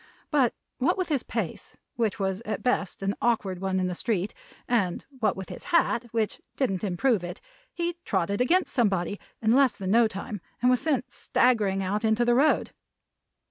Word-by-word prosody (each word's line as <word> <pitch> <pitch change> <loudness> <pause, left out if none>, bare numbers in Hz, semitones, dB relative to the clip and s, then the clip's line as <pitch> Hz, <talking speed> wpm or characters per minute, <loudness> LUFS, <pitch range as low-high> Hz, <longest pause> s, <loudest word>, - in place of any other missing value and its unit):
But 270 -6 +3 0.2
what 325 +9 +2
with 370 -2 -1
his 285 -5 +1
pace, 220 -9 -5 0.2
which 225 -4 0
was 190 +1 -1
at 220 -2 -4
best 200 -6 0
an 195 +1 +1
awkward 200 -6 0
one 190 -1 0
in 185 - +1
the 180 - -1
street; 200 0 -1 0.3
and 200 -8 0
what 215 -5 +1
with 190 -3 -6
his - - -8
hat, 335 -9 +2
which 225 -2 -1
didn't 195 -9 0
improve 205 +2 +1
it; 175 - -6 0.3
he 345 0 -2
trotted 200 +2 0
against 355 +9 +2
somebody 200 -5 +1 0.2
in 220 - +4
less 265 0 +4
than 190 -1 -2
no 230 +1 +5
time 205 0 -6 0.2
and 250 +1 +4
was 250 - +3
sent 280 -5 0
staggering 205 -6 +2
out 205 +4 -1
into 220 +2 +3
the 240 - +4
road. 285 +5 +3
220 Hz, 180 wpm, -27 LUFS, 195-250 Hz, 0.3 s, no